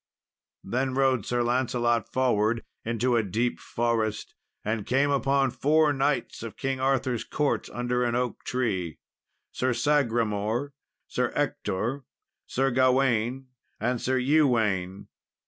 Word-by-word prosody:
Then 130 +5 -1
rode 130 -5 +2
Sir 120 0 +1
Lancelot 120 -1 0
forward 115 -3 +1 0.2
into 120 +2 0
a 115 - +4
deep 110 +4 -1
forest, 115 -2 -1 0.3
and 110 0 -1
came 140 +5 +2
upon 135 -1 +2
four 150 +3 +3
knights 135 -2 -1
of 115 -1 -7
King 135 -1 -2
Arthur's 130 -3 0
court, 150 -2 -1
under 125 0 -1
an 120 -1 0
oak 125 -1 -2
tree 95 - -2 0.5
Sir 130 0 0
Sagramour, 120 -2 0 0.3
Sir - - -1
Ector, 120 +9 -1 0.4
Sir 135 +1 +1
Gawain, 130 0 +2 0.3
and 120 +2 -1
Sir 130 +1 +1
Ewaine. 115 -10 +2
125 Hz, 120 wpm, -27 LUFS, 115-135 Hz, 0.5 s, a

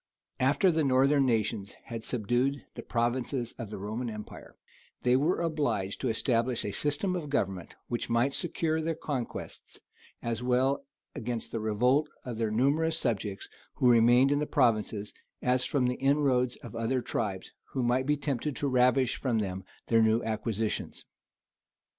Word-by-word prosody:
After 145 +8 +3
the 160 -1 +1
northern 135 +1 +4
nations 105 -3 -1
had 115 -1 -6
subdued 125 +5 0
the - - -7
provinces 120 +1 -1
of 115 -4 -5
the 110 - -6
Roman 110 +5 -4
empire, 105 -1 -9 0.5
they 125 0 +4
were 155 +7 +2
obliged 125 - -1
to 130 - 0
establish 115 +1 0
a 100 - -2
system 150 - 0
of 160 -5 -4
government 95 -10 -2
which 120 - -3
might 120 +4 +2
secure 160 -1 0
their 165 +1 -1
conquests, 135 -6 -6 0.4
as 115 -1 -2
well 130 +3 +1 0.3
against 120 0 -4
the 115 - -2
revolt 125 +8 +2 0.2
of 120 -3 -5
their 115 -1 +1
numerous 145 +8 +2
subjects 105 -8 -2 0.3
who 125 - +4
remained 120 +3 +5
in 145 - +2
the 150 - -1
provinces, 110 -6 +1 0.3
as 125 0 +1
from 135 -3 +1
the 125 0 0
inroads 135 -3 +2
of - - -9
other 115 +2 0
tribes, 95 -4 -3 0.2
who 130 - 0
might 125 +2 +1
be 150 0 +2
tempted 140 0 -2
to 145 - -1
ravish 125 -1 +3
from 125 -4 0
them 95 -3 -2 0.2
their 115 -1 +4
new 110 +1 +3
acquisitions. 110 0 -2
125 Hz, 160 wpm, -29 LUFS, 115-140 Hz, 0.5 s, remained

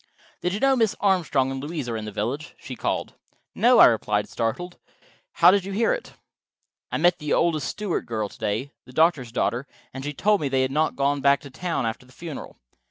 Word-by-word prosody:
"Did 180 - 0
you - - -3
know 270 +2 +4
Mrs. 225 -4 +2
Armstrong 160 -9 +2
and 135 0 -4
Louise 155 -3 -4
are 115 - -3
in 110 -1 -4
the 105 - -6
village?" 125 +10 -4
she - - -8
called. - - -2 0.4
"No," 245 +1 +4
I - - +10
replied, 105 -3 +2
startled. 175 +11 -3 0.5
"How - - +7
did 200 -1 +2
you 195 +1 -5
hear 230 - +2
it?" - - -6 0.8
"I - - 0
met 175 +2 +3
the 150 -2 -1
oldest 155 -5 +1
Stewart 210 -4 -3
girl 110 -2 -2
to - - -16
day, 110 +6 -2
the 125 - -15
doctor's 155 -7 +2
daughter, 125 +2 -1 0.3
and 135 0 -6
she 145 - -3
told 205 +7 +2
me 145 - -1
they 130 -1 +2
had 130 - -1
not 155 +3 +1
gone 140 0 +1
back 140 0 +4
to 140 -3 -11
town 165 -3 -2
after 115 +2 -4
the 130 - -19
funeral. 165 0 -8
145 Hz, 220 wpm, -24 LUFS, 125-175 Hz, 0.8 s, I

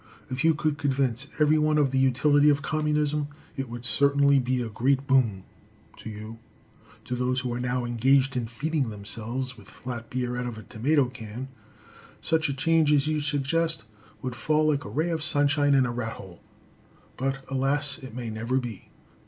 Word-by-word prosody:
If 130 +3 -2
you 160 -1 +4
could 150 -1 -1
convince 135 -2 0
every 155 +1 +4
one 155 0 +2
of 145 -3 +3
the 135 - +1
utility 145 +3 +4
of 140 -1 +2
Communism, 150 -1 0 0.3
it 135 -3 -4
would 120 +1 -7
certainly 140 +1 +4
be 125 0 0
a 120 - -2
great 135 +5 +1
boon 120 -8 +2 0.5
to - - -8
you. 110 +1 -8 0.7
To 125 - -3
those 125 +1 0
who 125 -1 -3
are 120 - -3
now 125 0 -1
engaged 130 +3 +3
in 120 -2 -1
feeding 140 +3 -1
themselves 115 +4 -5
with 100 - -15
flat 120 -2 -7
beer 125 -1 -2
out 125 0 -2
of 120 -2 -6
a 110 - -9
tomato 130 +5 +1
can, 120 +1 -8 0.7
such 160 -2 +1
a - - 0
change 160 +1 +3
as 145 -1 +4
you 155 0 0
suggest 150 +2 0 0.4
would 130 -1 -3
fall 155 +5 +1
like 145 -1 0
a - - -6
ray 160 +4 0
of 160 -2 -1
sunshine 145 -1 +3
in 135 -2 +4
a 120 - -2
rat 120 -2 -3
hole, 90 -3 -12 0.7
but 135 0 -2
alas! 135 +2 0
it 130 -4 -10
may 120 -3 -4
never 115 +4 -1
be. 120 -6 -5
135 Hz, 185 wpm, -26 LUFS, 120-145 Hz, 0.7 s, you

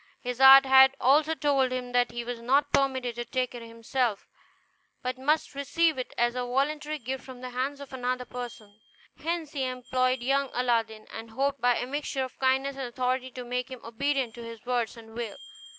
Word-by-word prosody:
His 250 0 -4
art 270 0 +10
had 265 0 +7
also 300 +5 +4
told 275 -4 +2
him 250 -1 -3
that 245 0 +2
he 240 0 -5
was 240 -1 -5
not 280 +4 +2
permitted 260 -3 +1
to 240 - -2
take 255 0 -2
it 240 - -7
himself, 230 -1 -2 0.8
but 255 +1 -3
must 300 +4 +1
receive 300 +2 +1
it 255 - -4
as 240 0 +2
a 250 - -2
voluntary 295 +5 -1
gift 260 0 -5
from 255 -2 -11
the 255 0 -6
hands 265 +3 -2
of 280 -1 -10
another 250 0 -2
person. 235 -4 -8 0.4
Hence 325 -1 -3
he 275 -3 -2
employed 255 0 0
young 275 +1 +1
Aladdin, 225 -3 0
and 225 0 -7
hoped 275 +4 -1
by 245 0 +4
a - - -2
mixture 275 0 -2
of 260 - -8
kindness 265 +1 +1
and 265 -2 -3
authority 255 +1 -1
to 250 0 -8
make 250 +1 -3
him 255 -2 -8
obedient 260 +1 -1
to 235 - -9
his 230 -1 -10
word 240 -2 0
and 225 -1 -13
will. 230 -3 -5
255 Hz, 200 wpm, -28 LUFS, 240-275 Hz, 0.8 s, art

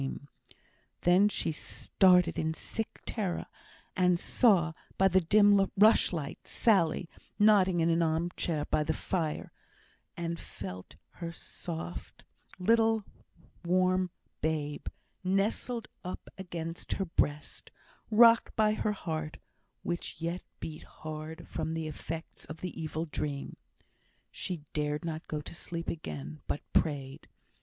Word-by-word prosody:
Then 185 +4 +5
she 165 - -1
started 180 +2 +3
in 160 0 0
sick 225 +6 -4
terror, 195 -6 -2 0.5
and 180 -2 +3
saw, 180 -10 +4 0.2
by 195 - +6
the 190 0 +4
dim 205 +2 +5
rushlight, 190 -8 +4
Sally, 180 -6 +3 0.3
nodding 195 -5 +5
in 165 - +3
an 165 +1 +3
arm 165 +1 +1
chair 155 -4 0
by 150 - +1
the 155 +1 -1
fire; 160 -5 -2 0.7
and 170 -1 -3
felt 90 -2 -8 0.2
her 170 - -3 1.3
little 225 +3 +3
soft - - -37 0.6
warm 185 +1 +2 0.3
babe, 150 -2 -2 0.4
nestled 210 +5 0 0.2
up 180 - -6
against 170 -3 -5
her 195 - -1
breast, 150 -3 -1 0.4
rocked 230 +1 +6
by 215 -1 +4
her 215 0 0
heart, 160 -5 -4 0.5
which 175 0 -3
yet 170 +2 -2 0.2
beat 155 -1 -6
hard 155 +1 -8
from 160 0 -3
the 160 -1 -2
effects 160 +2 -6
of 155 - -9
the 180 - -3
evil 160 +1 -2
dream. 145 -2 -4 0.8
She 175 -5 -4
dared 150 +1 -1
not 160 -1 -4
go 150 -1 -3
to - - -8
sleep 170 0 -5
again, 75 - -5
but - - -2
prayed. 140 -4 0
170 Hz, 125 wpm, -31 LUFS, 155-190 Hz, 1.3 s, by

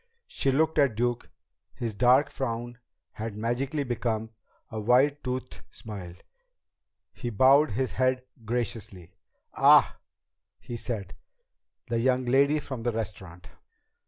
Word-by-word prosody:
She 135 - 0
looked 155 +3 +2
at 140 -6 +3
Duke. 120 +1 -1 0.5
His 115 -3 -3
dark 125 +6 +4
frown 120 -1 -4 0.3
had 110 -1 -6
magically 130 +6 -1
become 115 -3 -2 0.4
a 110 - -4
white 130 +6 +3
toothed 130 0 -5
smile. 95 -6 -9 1.0
He 120 - -5
bowed 130 +7 +5
his 130 0 -1
head 130 +3 +1 0.2
graciously. 110 -6 -4 0.4
"Ah," - - +5 0.6
he 120 - -7
said, 110 -5 -5 0.7
"the 115 -1 -1
young 130 +1 +1
lady 140 +4 +3
from 130 -4 -6
the 120 +1 0
restaurant." 95 -6 -6
120 Hz, 120 wpm, -27 LUFS, 110-130 Hz, 1.0 s, bowed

